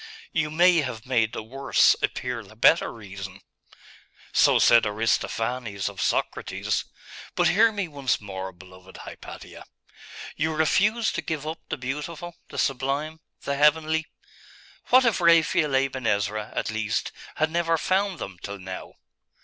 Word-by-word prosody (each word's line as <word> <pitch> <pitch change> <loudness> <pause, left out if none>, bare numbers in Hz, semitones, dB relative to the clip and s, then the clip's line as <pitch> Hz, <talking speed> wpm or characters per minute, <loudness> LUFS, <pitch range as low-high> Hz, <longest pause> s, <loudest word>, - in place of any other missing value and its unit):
'You 155 -1 0
may 175 +3 +5
have 125 -7 -4
made 115 -4 +1
the - - -5
worse 135 +5 +3
appear 125 -2 -2
the 110 +2 -16
better 140 +9 +4
reason.' 100 -3 -9 0.9
'So - - +5
said 115 -1 +6
Aristophanes 110 0 -1
of 100 -2 -5
Socrates. - - -1 0.5
But - - +3
hear 225 +4 +5
me 205 -4 -3
once 140 -5 -1
more, 95 -2 -6
beloved 90 +1 -15
Hypatia. - - -10 0.7
You 160 +1 -1
refuse 205 +8 +2
to - - -3
give 155 -1 -4
up 160 +1 -4
the - - -2
beautiful, 150 +6 -5
the - - -9
sublime, 140 +4 -1 0.2
the 140 - -2
heavenly? 155 +2 +3 0.8
What 255 +1 +6
if 225 -6 +2
Raphael 165 -4 +4
Aben 135 -2 0
Ezra, 105 +1 -1
at - - -1
least, 110 0 -2 0.2
had 155 0 0
never 165 -1 +1
found 190 +2 0
them 95 -2 -7
till 100 0 -6
now? 95 -1 -8
135 Hz, 140 wpm, -25 LUFS, 110-160 Hz, 0.9 s, said